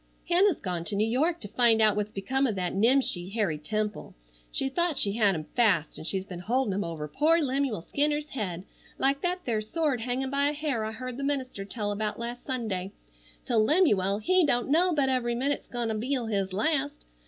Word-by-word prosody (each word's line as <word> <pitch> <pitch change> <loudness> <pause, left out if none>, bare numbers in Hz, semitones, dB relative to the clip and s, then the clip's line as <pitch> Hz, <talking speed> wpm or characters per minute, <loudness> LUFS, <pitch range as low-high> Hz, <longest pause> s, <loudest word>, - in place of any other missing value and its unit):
"Hannah's 360 0 +4
gone 180 -4 -3
to 205 - -3
New 215 +2 +2
York 310 +9 +1
to 205 - -4
find 230 +1 +4
out 215 -1 +5
what's 210 0 -1
become 265 +7 0
of 220 - -2
that 180 -2 -2
nimshi 215 -4 +2
Harry 195 -8 -1
Temple. 215 +6 -3 0.4
She 270 - 0
thought 335 +2 0
she 200 - +4
had 205 -3 +2
him 155 - -4
fast, 200 -10 +2
an' - - -8
she's 190 +2 0
been 180 -2 -8
holdin' 230 +3 0
him 200 +2 -1
over 160 -3 -5
poor 310 - +3
Lemuel 270 - -1
Skinner's 295 +4 -1
head 185 -8 -4 0.3
like 275 +1 +1
thet 360 +1 -1
there 225 -3 0
sword 275 +2 -1
hangin' 255 +2 -2
by 280 +1 +2
a 295 - 0
hair 290 -7 -2
I 220 - -3
heard 255 +1 -6
the 275 - -4
minister 260 -8 -2
tell 205 0 -3
about 210 +1 -2
last 240 +1 -6
Sunday, 210 -8 -3 0.5
till 225 -3 +2
Lemuel, 210 - +3
he 365 - +3
don't 245 -4 +1
know 355 +4 +4
but 285 -5 +1
every 245 -2 0
minute's 275 +4 -1
gone'll 230 -3 -2
be 260 +5 -1
his 210 -6 -2
last. 285 +8 -1
235 Hz, 205 wpm, -28 LUFS, 205-280 Hz, 0.5 s, out